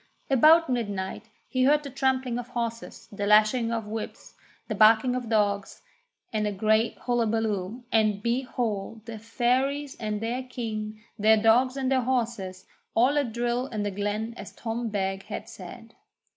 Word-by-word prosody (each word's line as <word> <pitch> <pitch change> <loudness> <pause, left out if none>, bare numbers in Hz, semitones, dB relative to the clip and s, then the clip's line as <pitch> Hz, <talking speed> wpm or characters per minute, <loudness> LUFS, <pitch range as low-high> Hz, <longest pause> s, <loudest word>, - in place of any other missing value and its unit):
About 315 +6 +6
midnight 210 -3 -3 0.2
he 255 -1 +1
heard 295 +2 +4
the 280 - -7
trampling 260 -2 0
of 245 - -6
horses, 235 -2 -5
the 205 0 -3
lashing 215 +3 +4
of 225 -2 -2
whips, 215 +1 -7 0.3
the 215 - -2
barking 220 +4 +5
of 245 -3 -4
dogs, 205 -3 0 0.5
and 215 -1 0
a - - -1
great 215 +3 +1
hullabaloo, 225 -2 -1
and, 215 -2 +2
behold, 235 -3 -2
the 225 -2 -7
Fairies 260 +5 0
and 215 -2 -2
their 235 +4 -2
king, 220 -4 -5 0.2
their 220 +1 +5
dogs 245 +4 +4
and 265 -1 -1
their 260 -1 +3
horses, 230 -7 -2 0.3
all 250 +5 +4
at 285 -6 +1
drill 240 +2 -1
in 215 -5 -3
the 205 - -2
glen 205 +3 -2
as - - -8
Tom 230 0 -3
Beg 195 -2 -2
had - - -6
said. - - -11
230 Hz, 160 wpm, -27 LUFS, 215-250 Hz, 0.5 s, About